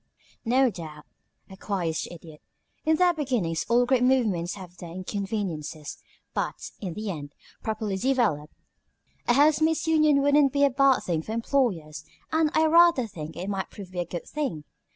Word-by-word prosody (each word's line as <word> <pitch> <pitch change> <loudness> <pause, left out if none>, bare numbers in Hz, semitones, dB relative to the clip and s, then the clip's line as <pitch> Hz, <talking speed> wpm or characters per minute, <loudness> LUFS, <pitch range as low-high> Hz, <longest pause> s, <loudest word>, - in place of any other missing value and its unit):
"No 255 +2 +3
doubt," 155 -5 -9 0.4
acquiesced 190 -4 -3
the - - -9
Idiot. 160 -2 -13 0.4
"In 315 0 +4
their 355 +2 +4
beginnings 245 - -1
all 240 +1 +4
great 250 0 +2
movements 220 -10 +1
have 180 -2 -11
their 175 - -9
inconveniences, 185 -5 -4 0.3
but - - -3
in 185 -5 -5
the 215 -1 -3
end, 145 -4 -8 0.3
properly 215 -3 -2
developed, 210 - 0 0.7
a 240 - +5
housemaid's 310 +4 +3
union 305 -3 +4
wouldn't 285 -1 +4
be 285 0 +2
a 280 - +2
bad 270 0 +4
thing 165 -3 -1
for 215 - -6
employers, 225 - -1 0.3
and 320 -1 +3
I 315 - +4
rather 335 -5 +5
think 160 -7 -8
it 185 - -5
might 195 -1 -3
prove 190 -3 -11
a 175 - 0
good 175 0 -6
thing. 270 - -3
215 Hz, 160 wpm, -26 LUFS, 175-275 Hz, 0.7 s, a